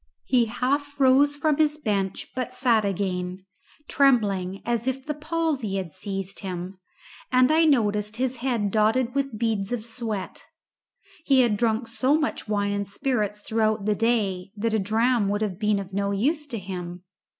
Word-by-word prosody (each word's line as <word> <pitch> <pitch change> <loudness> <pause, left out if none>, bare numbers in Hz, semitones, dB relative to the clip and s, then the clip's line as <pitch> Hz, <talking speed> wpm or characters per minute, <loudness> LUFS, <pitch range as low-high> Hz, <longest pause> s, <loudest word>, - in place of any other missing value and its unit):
He 245 -3 +3
half 280 +5 -2
rose 275 +2 +5
from 305 -1 +1
his 305 -1 +2
bench, 200 -9 -2
but 255 0 -3
sat 235 -5 +3
again, 185 -1 -2 0.4
trembling 200 -9 +2
as 235 0 -1
if 260 +1 -2
the 300 - -2
palsy 300 - -2
had 185 -5 -4
seized 195 0 -5
him, 185 -1 -6 0.5
and 255 +2 +5
I 320 +1 +5
noticed 210 -6 +1
his 260 0 -1
head 235 -5 -1
dotted 225 +4 +2
with 275 -5 -1
beads 215 -3 -1
of 235 -3 -3
sweat. 225 -4 -5 0.8
He 270 -4 +4
had 235 -4 +2
drunk 225 +2 0
so 255 +5 +2
much 305 -7 -2
wine 205 -1 0
and 200 0 -2
spirits 210 -2 -1
throughout 220 -1 0
the 210 - +2
day 205 -4 0
that 225 +2 -1
a 220 - +2
dram 220 +1 +2
would 205 +1 0
have 190 -4 -3
been 210 -1 +2
of 195 -1 -6
no 200 +1 0
use 290 +10 0
to 240 -5 -4
him. 180 -2 -6
220 Hz, 170 wpm, -25 LUFS, 200-260 Hz, 0.8 s, rose